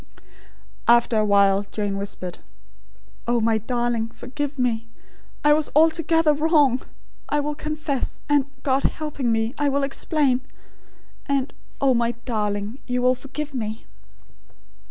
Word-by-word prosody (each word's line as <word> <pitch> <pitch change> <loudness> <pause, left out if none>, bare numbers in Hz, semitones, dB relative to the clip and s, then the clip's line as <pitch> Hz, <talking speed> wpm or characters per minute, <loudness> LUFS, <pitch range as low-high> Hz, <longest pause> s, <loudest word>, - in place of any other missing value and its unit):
After 235 0 +5
a 215 - +3
while 200 -1 +4
Jane 205 -2 -2
whispered: 195 -3 -5 0.9
"Oh, 240 0 +2
my 220 0 +2
darling, 240 0 -1
forgive 285 +5 -5
me. 230 -3 0 0.6
I 295 0 +6
was 305 0 +1
altogether 325 0 +4
wrong. 295 -4 +3 0.5
I 295 - +2
will 295 +1 -1
confess; 305 -2 -3
and, 290 -2 +3 0.2
God 270 -1 +2
helping 285 -6 -1
me, 225 +1 0
I 290 -1 +2
will 280 0 +1
explain; 275 -2 +1 0.9
and, 275 -1 0 0.3
oh, 270 -2 +4
my 235 0 +1
darling, 210 0 -2
you 250 0 0
will 250 0 +5
forgive 275 +3 -6
me?" 220 -3 -4
255 Hz, 130 wpm, -23 LUFS, 225-290 Hz, 0.9 s, I